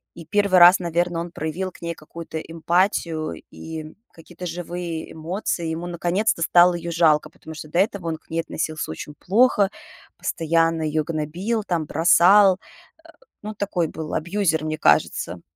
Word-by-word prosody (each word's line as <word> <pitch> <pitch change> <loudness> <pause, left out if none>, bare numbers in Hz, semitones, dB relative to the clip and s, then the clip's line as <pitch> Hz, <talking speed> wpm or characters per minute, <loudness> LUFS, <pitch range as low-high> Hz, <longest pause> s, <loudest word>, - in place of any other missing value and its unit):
И 170 - -10
1 200 -3 +4
раз, 175 +2 +8
наверное, 170 -1 -1
он 170 0 -7
проявил 175 +5 -4
к - - -18
ней 170 0 -3
какую-то 160 +1 -9
эмпатию 165 -1 -1 0.2
и 160 -1 -8 0.2
какие-то 165 +2 -11
живые 170 -1 -5
эмоции. 170 0 -3
Ему 170 +2 -5
наконец-то 175 +3 0
стало 175 +1 +5
её 170 0 -5
жалко, 160 -3 +3
потому 160 - -12
что 155 - -8
до 170 - 0
этого 195 -3 0
он 160 - -2
к - - -33
ней 165 - -2
относился 155 - -4
очень 145 - -8
плохо, 205 -1 +3 0.5
постоянно 165 0 0
её 155 0 0
гнобил, 170 +8 -2
там, 170 -5 -1
бросал. 185 +5 +5
Э, - - -22 0.7
ну, 215 - -5
такой 190 -5 -1
был 155 0 -7
абьюзер, 170 -2 0
мне 155 0 -2
кажется. 85 - +1
170 Hz, 160 wpm, -22 LUFS, 160-180 Hz, 0.7 s, раз